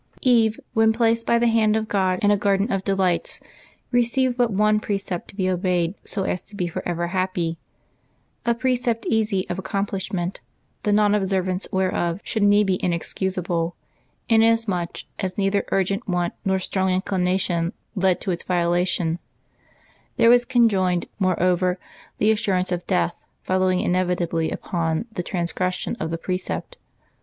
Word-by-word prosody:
eVE, 225 -4 +3
when 220 0 +4
placed 230 0 +1
by 235 - +4
the 235 - +2
hand 225 -2 +3
of 220 0 -1
God 190 -3 +1
in 205 - +5
a - - +5
garden 200 +2 +1
of 195 -1 -1
delights, 190 -3 0 0.5
received 245 +1 +2
but 245 -2 +2
one 210 +2 +3
precept 195 -4 -3
to - - -12
be 190 -2 0
obeyed 180 -1 0
so 195 - -2
as 185 -1 -1
to 205 - -15
be 180 - -1
forever 170 0 -3
happy 175 -3 -1 0.4
— - - -42
a 235 - +3
precept 245 -2 0
easy 215 -4 0
of 175 - -3
accomplishment, 195 -2 -3 0.4
the 210 - 0
non 205 0 +4
observance 190 -2 0
whereof 185 -2 0
should 220 - -1
needs 205 +1 +5
be 185 -1 -1
inexcusable, 175 -1 -1 0.5
inasmuch 225 -6 +2 0.2
as 185 -1 -3
neither 200 0 +1
urgent 195 +1 0
want 175 -1 0
nor 190 0 +1
strong 190 0 -1
inclina 185 0 +1
tion 170 -2 0 0.2
led 190 -3 +2
to 190 - -2
its 175 - -2
violation; 175 -1 0 1.0
there 230 - +6
was 245 0 +5
conjoined, 195 -8 +2
moreover, 185 -1 +2 0.4
the 215 - +3
assurance 195 -4 0
of 175 0 -3
death 180 -2 0 0.2
following 185 -1 +1
inevitably 175 -3 0
upon 165 +2 -2
the 185 - -3
transgression 180 +2 -2
of 160 - -2
the 165 - -2
precept. 185 - -4
190 Hz, 150 wpm, -23 LUFS, 180-210 Hz, 1.0 s, there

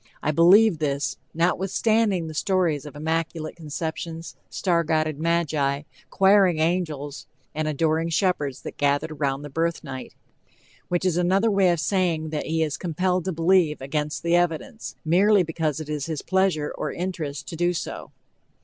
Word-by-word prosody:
I 150 - +2
believe 175 +3 +6
this, 145 -1 -1
notwithstanding 190 +3 +1
the 160 - -6
stories 160 -3 0
of 145 - -11
immaculate 160 +1 -2
conceptions, 165 +1 -5
star 170 -3 +1
guided 155 -2 0
magi, 155 -4 0 0.3
choiring 195 -3 +5
angels 155 -4 -2 0.3
and 155 0 -2
adoring 160 +2 +1
shepards 155 -6 0
that - - -7
gathered 145 +2 +1
around 140 -2 -2
the 145 - -7
birth 165 +3 -1
night." 130 -3 -8 0.7
Which 175 +1 -1
is 175 -2 +1
another 190 +5 +2
way 195 -2 +4
of 170 -2 +1
saying 160 -1 0
that 150 - -3
he 160 0 +1
is 150 -2 -2
"compelled 180 +1 -1
to 190 - -1
believe" 165 -2 +2
against 145 +1 -3
the 170 0 +2
evidence, 175 +5 -1
merely 190 +4 +4
because 160 -2 -2
it 155 - -6
is 150 -1 -3
his 155 -4 -4
pleasure 190 -6 +1
or - - -3
interest 165 -6 -4
to - - -6
do 175 +2 +1
so. 175 - -5
165 Hz, 160 wpm, -24 LUFS, 150-180 Hz, 0.7 s, believe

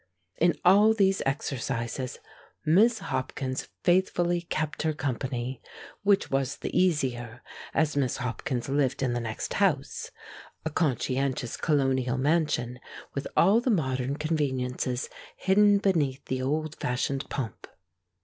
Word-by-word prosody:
In 170 +1 +4
all 205 +4 +6
these 195 -2 +3
exercises 130 -2 -2 0.5
Miss 215 +9 +5 0.2
Hopkins 130 0 -3 0.2
faithfully 175 -1 +2
kept 155 -2 -3
her 160 -1 +1
company, 130 -2 -3 0.4
which 200 -1 +2
was 135 0 0
the - - -5
easier 125 -9 0 0.3
as 155 -2 +1
Miss 135 -4 +1
Hopkins 125 0 -3
lived 135 -1 +1
in 125 -2 +1
the 120 - -1
next 115 -2 -4
house, - - 0 0.6
a 160 - -1
conscientious 135 -4 0
Colonial 135 -4 +1
mansion 135 -4 +1 0.3
with 140 - -3
all 205 +6 +5
the 250 - 0
modern 135 - 0
conveniences 130 -5 -1 0.3
hidden 205 +2 +4
beneath 160 -10 0
the 130 0 -2
old 150 +3 -1
fashioned 135 +2 -2
pomp. 130 -5 -5
140 Hz, 120 wpm, -28 LUFS, 130-170 Hz, 0.6 s, all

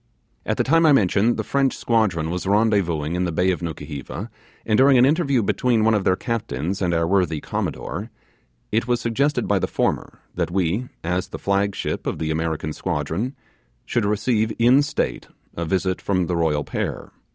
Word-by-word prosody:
At - - 0
the - - +2
time 165 +4 +3
I 150 - +6
mention, 110 0 +3
the - - -2
French 135 -1 0
squadron 95 -9 +1
was 90 +1 -3
rendezvousing 100 -7 +1
in 90 +1 0
the 85 - -1
bay 90 +4 +2
of 90 - -3
Nukuheva, 85 - -6 0.3
and 110 - +2
during 135 +2 +6
an 125 - +6
interview 140 -5 +2
between 110 +3 +1
one 110 0 +4
of 105 -3 0
their 95 - +4
captains 95 - -3
and 90 -2 +1
our 85 -1 +1
worthy 90 -3 +1
Commodore, - - -4 0.6
it 115 +2 0
was 120 -1 +1
suggested 130 +5 0
by - - +2
the - - -1
former, - - -1 0.2
that - - -1
we, 95 +6 0 0.2
as 90 +2 -1
the - - -7
flag 100 0 0
ship - - -3
of - - -2
the 80 -1 -2
American 80 -1 -2
squadron, 80 - -3 0.5
should 115 - 0
receive, 110 +1 +1
in 125 +4 +5
state, 145 - -2 0.3
a 85 - -3
visit 95 +2 -1
from 90 -3 0
the 90 - -2
royal 80 -3 +1
pair. - - -4
100 Hz, 185 wpm, -22 LUFS, 85-115 Hz, 0.6 s, I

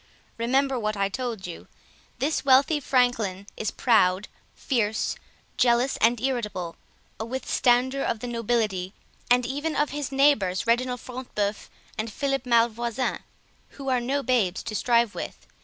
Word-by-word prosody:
Remember 265 +2 +1
what 215 -1 -2
I 195 0 +1
told 235 -3 -4
you: 175 -2 -8 0.5
this 300 +4 0
wealthy 275 +3 +4
franklin 245 -8 +1
is 215 - -2
proud, 200 -5 +2 0.3
fierce, 220 -5 0 0.4
jealous, 245 +2 +3
and 235 +1 +3
irritable, 210 -9 -2 0.4
a - - -2
withstander 260 +2 +1
of 235 - 0
the 245 - -6
nobility, 225 -5 -1 0.4
and 245 0 +4
even 290 +5 -2
of 295 - +1
his 290 -2 -4
neighbors, 270 -10 +3
Reginald 245 +1 +1
Front 255 0 -9
de 205 -1 +2
Bœuf 210 - -15 0.3
and 220 0 -2
Philip 275 +1 -2
Malvoisin, 235 +1 +1 0.6
who 275 -1 -4
are 255 -1 +2
no 275 +3 -1
babies 220 -9 +1
to 215 - -5
strive 235 0 +2
with. - - -7
240 Hz, 145 wpm, -26 LUFS, 215-260 Hz, 0.6 s, wealthy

